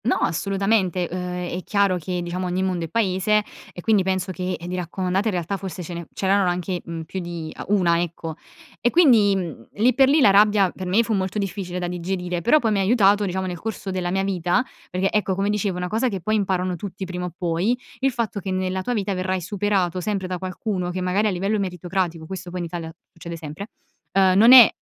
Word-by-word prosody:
No, 250 - +3
assolutamente. 195 0 +1
Uhm, 180 - -3 0.4
è - - -4
chiaro 200 -3 +2
che, 180 +1 -3
diciamo, 180 +1 -3
ogni 180 +1 -1
mondo 180 -3 -1
è - - -10
paese 210 -1 +2 0.3
e 175 - -9
quindi 215 0 +3
penso 190 0 -1
che 185 0 -3
di 175 +2 -5
raccomandate 185 +3 -1
in 215 - 0
realtà 175 +3 -2
forse 190 -1 -6
ce 175 - -7
ne 170 -2 -6
c'erano 195 -1 +2
anche, 180 0 -2
mhmm, 165 -1 -6
più 190 +4 -6
di 170 -3 -6
ah, - - -7
1, 175 -4 +3
ecco. 165 -1 -4 0.5
E 240 - +2
quindi, 235 - +5
mhmm, 170 -11 -5
lì 235 +5 +3
per 270 +2 +5
lì 300 +3 +4
la 230 -8 +6
rabbia 205 -2 +5
per 185 - -7
me 200 +6 +3
fu 225 - -1
molto 190 0 -1
difficile 185 -2 -3
da 180 -1 -2
digerire, 180 0 -3
però 240 - +5
poi 230 -7 +1
mi 205 - +1
ha - - +2
aiutato, 205 -1 +4
diciamo, 190 0 -2
nel 180 -2 -4
corso 200 -1 -5
della 185 -1 -2
mia 195 +2 0
vita, 185 +3 +1 0.3
perché 185 +2 0
ecco, 205 -3 +1
come 200 +2 0
dicevo, 205 -3 -1
una 180 0 -2
cosa 220 +7 0
che 195 -4 -3
poi 215 +5 -1
imparano 185 -3 0
tutti 190 +1 -6
prima 180 -1 -4
o 180 - -6
poi, 180 +7 0 0.2
il 270 0 +2
fatto 230 -4 -2
che 195 - -6
nella 185 0 -1
tua 245 +6 -2
vita 200 -2 -1
verrai 185 0 -1
superato 185 -1 -1
sempre 195 0 -2
da 180 -1 -4
qualcuno 185 0 -3
che 180 +1 -3
magari 185 +4 +1
a - - +3
livello 195 +3 0
meritocratico, 180 -3 -2
questo 185 +1 -7
poi 180 +1 -5
in - - -3
Italia 165 -1 -6 0.2
succede 170 0 -8
sempre, 160 +6 -8 0.4
ehm, 190 -1 +4
non 225 +5 +7
è, 255 -3 +11
185 Hz, 225 wpm, -23 LUFS, 180-205 Hz, 0.5 s, è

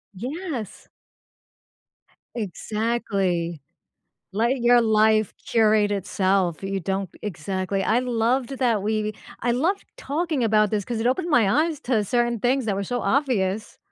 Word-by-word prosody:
Yes. 265 - -5 1.5
Exactly. 200 - -2 0.7
Let 235 +6 +1
your 240 0 +5
life 215 -1 +3
curate 215 -2 +3
itself, 190 -2 0
you 195 0 -2
don't 190 0 -2
exactly, 190 +1 -2
I 230 +3 +2
loved 245 +1 0
that 230 -6 +2
we 215 0 0
we 215 0 -3 0.3
I 240 0 +1
loved 335 +11 0
talking 315 - -2
about 215 -1 +3
this 205 -2 0
'cause 235 +1 -4
it 235 - +1
opened 340 +7 0
my 230 -9 +4 0.2
eyes 315 -4 -4
to 230 -4 +1
certain 240 +2 0
things 255 +2 +1
that 205 - 0
were 200 - -2
so 245 +4 -2
obvious. 220 -8 0
220 Hz, 140 wpm, -24 LUFS, 200-245 Hz, 1.5 s, your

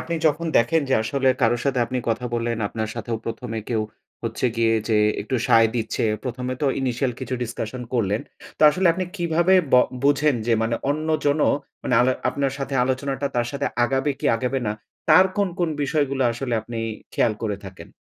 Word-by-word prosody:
আপনি 170 - -4
যখন 155 +2 +1
দেখেন, 160 +8 +3
যে - - +5
আসলে 135 +3 0
কারো 120 +1 +4
সাথে 135 -2 +1
আপনি 125 +1 -2
কথা 115 +2 -1
বললেন, 115 0 -1
আপনার 110 -1 -3
সাথেও 115 0 -3
১ম 115 - -5
এ - - -3
কেউ 110 -2 +1 0.4
হচ্ছে 115 +2 -1
গিয়ে 115 -1 +3
যে 110 - +3 0.3
একটু 130 +5 -2
সায় 115 0 +6
দিচ্ছে। 115 -1 -1 0.2
১ম 125 0 -4
এ - - -2
তো - - +3
ইনিশিয়াল 125 0 0
কিছু 130 0 -3
ডিসকাশন 120 +1 -5
করলেন। 105 -3 +1 0.4
তো - - 0
আসলে 185 +4 +1
আপনি 185 +2 -2
কিভাবে 170 +1 +2 0.2
ব - - +7 0.3
বুঝেন 145 0 +3
যে 120 - +2
মানে 115 +1 0 0.2
অন্যজনও 155 -1 +1 0.3
মানে 125 - 0
আলো 130 +1 +3 0.2
আপনার 135 +1 -1
সাথে 135 0 -4
আলোচনাটা 135 +1 -1
তার 120 0 +1
সাথে 140 0 -1 0.2
আগাবে 135 +3 0
কি - - -1
আগাবে 130 +3 -1
না। 105 - 0 0.4
তার 185 - +7
কোন, 200 -2 +2
কোন 175 -2 +1
বিষয়গুলো 140 -2 0
আসলে 120 +1 -3
আপনি 120 - -7 0.4
খেয়াল 115 - +2
করে 105 -2 -1
থাকেন? 95 -1 -11
130 Hz, 190 wpm, -23 LUFS, 115-145 Hz, 0.4 s, ব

